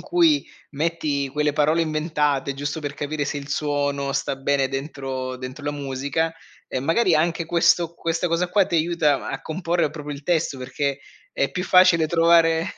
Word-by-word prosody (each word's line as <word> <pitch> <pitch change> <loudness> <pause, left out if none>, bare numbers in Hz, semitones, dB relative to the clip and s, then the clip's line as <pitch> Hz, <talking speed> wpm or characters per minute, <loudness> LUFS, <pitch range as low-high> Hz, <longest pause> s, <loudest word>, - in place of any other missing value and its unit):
cui 320 -2 +3 0.3
metti 150 -2 -1
quelle 150 +2 0
parole 155 +3 +2
inventate, 150 -3 0
giusto 145 +3 -4
per 145 -2 -5
capire 145 0 -3
se 145 - -3
il 140 0 -7
suono 145 -1 -1
sta 135 - -1
bene 135 0 +1
dentro 135 -2 -4
dentro 130 +3 -8
la 145 - 0
musica, 140 +3 -2 0.3
e 130 - -3
magari 165 - +2
anche 165 +1 +1
questo 170 0 +2
questa 165 +1 -1
cosa 170 +1 0
qua 195 +1 +3
ti - - -4
aiuta 160 -3 +1
a 135 - -4
comporre 170 0 -1
proprio 150 -1 -7
il 140 0 -11
testo 160 -5 0
perché 135 +2 -2 0.3
è 140 - 0
più 180 - -4
facile 180 -3 +5
trovare, 165 0 +4
150 Hz, 170 wpm, -23 LUFS, 140-165 Hz, 0.3 s, facile